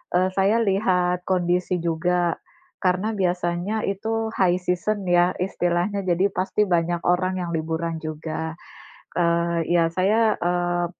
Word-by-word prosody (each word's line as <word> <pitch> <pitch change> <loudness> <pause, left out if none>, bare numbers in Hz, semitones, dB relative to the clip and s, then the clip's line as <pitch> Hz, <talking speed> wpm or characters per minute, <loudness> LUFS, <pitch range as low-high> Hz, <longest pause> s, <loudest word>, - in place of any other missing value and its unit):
eee, 185 +1 +3
saya 200 +4 +3
lihat 180 -3 +1
kondisi 180 0 +1
juga. 170 +1 0 0.5
Karena 185 +4 +1
biasanya 180 +2 -1
itu 220 +3 -2
high 180 -2 +2
season 185 +3 -1
ya 175 0 +3
istilahnya, 180 +2 -1
jadi 185 +2 +1
pasti 190 +3 0
banyak 170 -1 0
orang 185 +1 +1
yang 170 -1 -4
liburan 160 0 -2
juga. 160 +1 -5 0.6
Eee, 170 -1 +1
ya 170 -1 +4
saya, 215 +4 +3
eee, 175 0 0
180 Hz, 125 wpm, -23 LUFS, 170-190 Hz, 0.6 s, ya